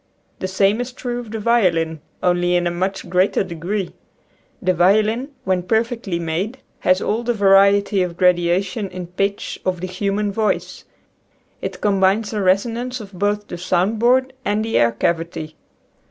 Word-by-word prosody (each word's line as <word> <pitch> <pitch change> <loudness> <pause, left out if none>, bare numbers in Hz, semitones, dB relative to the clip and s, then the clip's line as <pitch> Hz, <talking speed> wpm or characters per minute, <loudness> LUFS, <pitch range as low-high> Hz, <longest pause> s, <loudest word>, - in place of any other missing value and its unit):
The 185 - -2
same 195 +4 +2
is 245 +1 -5
true 245 -1 -4
of 240 -3 -8
the 220 - -4
violin, 175 -9 +1 0.2
only 175 0 +2
in 175 0 +1
a 175 - +1
much 190 +2 -3
greater 180 +3 +2
degree. 185 +2 -4 0.7
The 185 -1 +1
violin, 215 - +2
when 185 -1 +1
perfectly 220 -1 -1
made, 170 +9 -3 0.2
has 185 +1 +2
all 220 +3 0
the 240 0 -1
variety 200 0 +4
of 175 -2 -2
gradation 180 +3 +1
in 185 -1 -6
pitch 195 +3 -3
of 185 -1 -1
the 185 - -4
human 200 +2 -1
voice. 210 -1 -2 0.8
It - - -5
combines 200 +1 +2
the 210 -2 -2
resonance 230 +7 0
of 205 -2 -10
both 205 +2 -1
the 175 - -7
sound 185 +4 0
board 260 +3 +3
and 210 -1 0
the 225 - -3
air 115 0 +4
cavity. 160 +4 -2
195 Hz, 160 wpm, -20 LUFS, 180-215 Hz, 0.8 s, variety